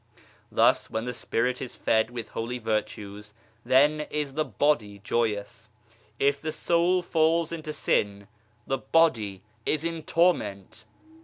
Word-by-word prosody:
Thus, - - +3
when 110 +1 -3
the 125 - -3
Spirit 125 +1 -1
is 130 - -6
fed 110 0 +2
with 120 -2 -6
holy 115 +2 -4
virtues, 105 -2 -4 0.3
then 145 +5 +3
is 150 -2 -2
the 155 +2 +1
body 120 -11 0
joyous; 105 +1 -2 0.5
if 140 0 +2
the 155 - -2
soul 170 +3 +2
falls 165 0 +2
into 155 -2 -5
sin, 100 -8 0 0.4
the 135 -1 -1
body 115 - +2 0.2
is 155 0 0
in 165 -1 -3
torment 115 - 0
125 Hz, 135 wpm, -27 LUFS, 110-155 Hz, 0.5 s, Thus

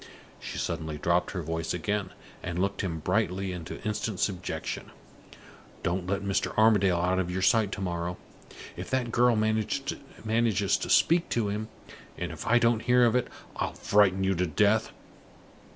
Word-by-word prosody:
She - - -7
suddenly 80 -1 -3
dropped 85 +3 +1
her 90 -3 -4
voice 80 +2 -2
again, 100 +3 -2 0.3
and 85 0 -4
looked 100 +2 0
him 90 -5 -2
brightly 95 +1 0
into 85 -2 -6
instant 105 -2 -2
subjection. 90 -3 -3 0.9
"Don't 90 +1 -1
let 100 +1 -1
Mr. 100 -1 -1
Armadale 105 -5 +4
out 90 +2 +1
of 90 -1 -1
your 90 +1 -2
sight 110 -1 +3
to 105 - -5
morrow! 85 -1 -3 0.6
If - - -7
that 125 -3 0
girl 120 0 +4
manages 110 -1 0
to - - -4
speak 170 +1 +4
to 110 -3 0
him, 105 +2 -3 0.5
and - - -4
if - - -7
I 120 +2 +5
don't 115 -1 +3
hear 125 0 +4
of 115 0 +2
it, 125 - +1 0.3
I'll - - -2
frighten 95 -2 +3
you 95 0 +2
to 90 0 0
death. 105 +7 +2
100 Hz, 165 wpm, -28 LUFS, 90-110 Hz, 0.9 s, I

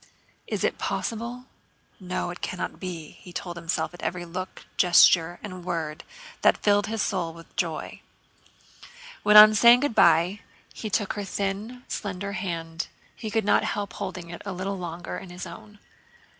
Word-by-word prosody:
"Is - - -2
it - - 0
possible? 235 +2 -3 0.5
No, 180 -2 -3
it 180 - -10
can't 180 - -4
be," 170 -5 -7
he 180 - -12
told 175 0 -5
himself 170 +1 -2
at 175 - -11
every 175 -1 -3
look, 185 +2 -7
gesture, 175 -1 +5
and 185 -4 -7
word 160 -3 -3 0.4
that - - +5
filled 205 0 +2
his 220 0 -1
soul 175 -5 -2
with 165 0 -15
joy. 165 -3 -3 1.2
When 210 +1 +6
on 215 0 +11
saying 235 +3 +7
good 290 -4 0
by 170 +2 +4 0.3
he 215 - -5
took 205 0 0
her 205 - -4
thin, 200 +5 -3
slender 200 -1 -4
hand, 170 -3 -4 0.3
he 220 - -6
could 220 -1 0
not 205 - +4
help 205 -1 -3
holding 180 -3 -6
it 175 - -8
a 195 - -4
little 190 +2 -3
longer 175 0 -5
in 190 - -11
his 175 0 -7
own. 210 0 -11
185 Hz, 165 wpm, -26 LUFS, 175-210 Hz, 1.2 s, on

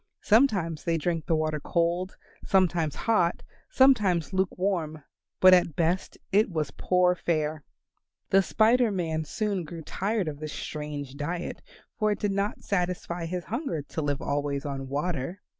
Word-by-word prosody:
Sometimes 200 - +3
they 165 -1 +1
drank 165 0 -2
the 165 - +2
water 155 -1 -1
cold, 170 +4 -1 0.3
sometimes 175 -5 +2
hot, 180 -7 +1 0.3
sometimes 210 - +3
luke 190 -1 0
warm, 165 -6 -1 0.4
but 185 0 +8
at 175 -4 +4
best 170 +3 0
it 210 +3 +4
was 155 -5 -2
but - - -13
poor 180 -1 +4
fare. 155 -3 -1 0.7
The 195 - +6
Spider 230 +4 +3
Man 160 -4 -2
soon 200 +2 -2
grew 165 +1 -8
tired 200 +3 -1
of 145 -2 -5
this 155 -1 -6
strange 150 -3 -5
diet, 170 +4 -4 0.4
for 215 -1 +2
it 205 - -1
did 205 - -1
not 200 +1 -2
satisfy 175 -2 -2
his 180 +1 -3
hunger 220 - -3
to 160 - -3
live 145 -2 -2
always 140 0 -2
on 135 -2 -4
water. 150 +4 -3
175 Hz, 160 wpm, -27 LUFS, 155-195 Hz, 0.7 s, but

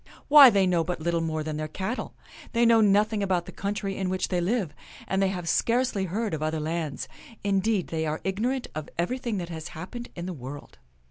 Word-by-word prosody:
Why, 285 -2 +11
they 200 -4 +3
know 175 -2 +2
but 175 +1 -3
little 170 +1 0
more 160 -1 -2
than 155 -1 -4
their 155 0 -3
cattle. 190 - -4 0.4
They 235 0 +4
know 230 -1 +6
nothing 210 +1 +3
about 185 -3 0
the - - -9
coun 200 +1 -3
try 200 -1 -2
in 190 -1 -2
which 185 0 -1
they 180 -2 0
live; 190 -4 0 0.3
and 190 0 0
they 195 - +4
have 180 -3 -4
scarcely 235 +1 +1
heard 210 +3 -2
of 155 - -3
other 155 0 -1
lands. 155 -1 -3 0.4
Indeed, 200 0 +1
they 160 -1 -1
are 155 +1 -2
ignorant 240 +7 -1
of 155 -1 -5
everything 235 +5 -1
that 175 -2 -4
has 160 -2 -6
happened 240 +9 -7
in 175 - -5
the 185 - -4
world." 140 0 -9
185 Hz, 215 wpm, -27 LUFS, 165-215 Hz, 0.4 s, Why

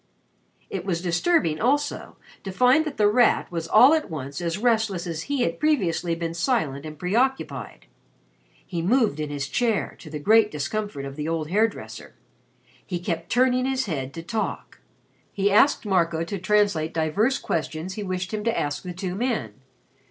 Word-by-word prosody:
It 190 -3 -3
was 180 -3 -1
disturbing, 175 - +1
also, 290 +5 0 0.3
to 195 - -5
find 255 +9 +4
that 305 - -5
The 210 - +4
Rat 235 -1 +3
was 165 -1 -3
all 245 - +7
at 315 -1 0
once 140 -1 -6
as 170 +1 -2
restless 220 -5 +1
as 165 -2 -4
he 280 -3 +1
had - - -2
previously 180 - +1
been 165 0 -4
silent 165 - -1
and 155 0 -9
preoccupied. 180 - -1 0.8
He 170 - -4
moved 215 - +2
in 150 -1 -3
his 140 -1 -3
chair, 225 - 0
to 155 - -11
the 150 - -5
great 215 +7 +4
discomfort 150 0 -4
of 135 +1 -8
the 150 0 -3
old 165 -1 -2
hair 215 +4 +4
dresser. 215 - -10 0.7
He 180 - -4
kept 170 -1 -4
turning 255 +1 +3
his 265 -1 0
head 135 -8 -3
to 165 - -6
talk. 220 +5 -4 0.5
He 200 0 +1
asked 230 +5 +4
Marco 170 -4 +1
to 195 +3 -5
translate 185 -5 +1
divers 200 - +1
questions 160 +3 -3
he 210 - -5
wished 185 -1 -3
him 210 -1 -2
to 230 - +1
ask 145 0 -2
the 180 -1 -6
two 185 0 -4
men. 215 - -2
185 Hz, 175 wpm, -24 LUFS, 160-225 Hz, 0.8 s, all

